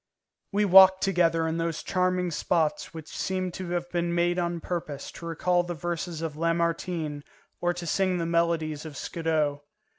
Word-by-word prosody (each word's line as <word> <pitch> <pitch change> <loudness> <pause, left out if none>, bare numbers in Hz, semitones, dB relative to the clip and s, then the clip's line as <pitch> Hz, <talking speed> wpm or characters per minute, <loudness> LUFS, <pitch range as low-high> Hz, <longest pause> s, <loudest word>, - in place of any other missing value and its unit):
We 205 +1 +2
walked 190 0 +8
together 165 -4 +2
in 160 +1 -1
those 165 -1 -2
charming 180 -1 0
spots 155 0 0
which 160 -1 -9
seemed 185 -1 -3
to 185 -1 -6
have 175 0 -2
been 170 0 -1
made 175 +1 +2
on 170 -1 -1
purpose 165 -4 -5
to 170 - -9
recall 175 +2 +1
the 175 0 -5
verses 170 0 -4
of 160 -2 -3
Lamartine 165 -2 -1 0.4
or 175 - +2
to 175 -1 -6
sing 185 +2 +1
the 170 - -1
melodies 165 -3 0
of 155 -4 -8
Scudo. 155 -3 -1
170 Hz, 170 wpm, -27 LUFS, 165-180 Hz, 0.4 s, walked